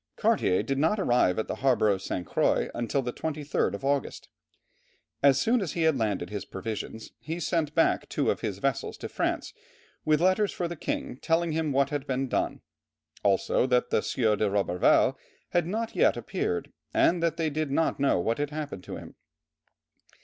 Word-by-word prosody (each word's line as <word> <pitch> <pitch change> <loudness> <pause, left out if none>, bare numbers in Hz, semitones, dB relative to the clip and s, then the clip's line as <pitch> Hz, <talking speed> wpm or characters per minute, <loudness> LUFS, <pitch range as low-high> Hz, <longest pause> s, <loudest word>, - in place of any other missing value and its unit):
Cartier 90 - +2
did 135 0 -1
not 165 +8 +2
arrive 120 - +3
at 110 - -1
the - - -4
harbour 125 -5 +3
of 100 -2 +1
St. 90 -2 -3
Croix - - +1 0.2
till 140 - +1
the 125 0 -3
23rd 150 -2 -1
of 135 - -7
August. 140 -1 -1 0.9
As 140 -1 +5
soon 235 - +2
as 170 -7 -3
he 170 - 0
had 160 -2 +4
landed 105 -3 -1
his 100 -2 -4
provisions, 110 +2 -6
he 165 +3 -5
sent 160 -2 -1
back 165 - +2
two - - +1
of - - -4
his - - -3
vessels - - -2
to - - -6
France 460 - -2 0.5
with 155 -1 +3
letters 185 +4 +3
for 175 - -2
the 170 - -5
king, 135 - -4
telling 165 +3 +1
him 155 -1 0
what 140 +1 +2
had 145 -1 -3
been 135 0 -1
done, - - -1 0.6
also 100 +5 +2
that 125 -1 +1
the - - +3
Sieur 110 +1 +1
de 105 0 +1
Roberval 95 -3 +3 0.3
had 175 -2 +1
not 220 +4 -3
yet - - +3
appeared, 435 +1 -3 0.2
and 175 0 +3
that 170 -1 0
they 160 -2 0
did 155 0 -2
not 150 +2 +1
know 140 -9 +3
what 115 +8 -1
had 145 -1 -1
happened 145 -11 -5
to - - -6
him. - - -10
140 Hz, 190 wpm, -28 LUFS, 115-165 Hz, 0.9 s, As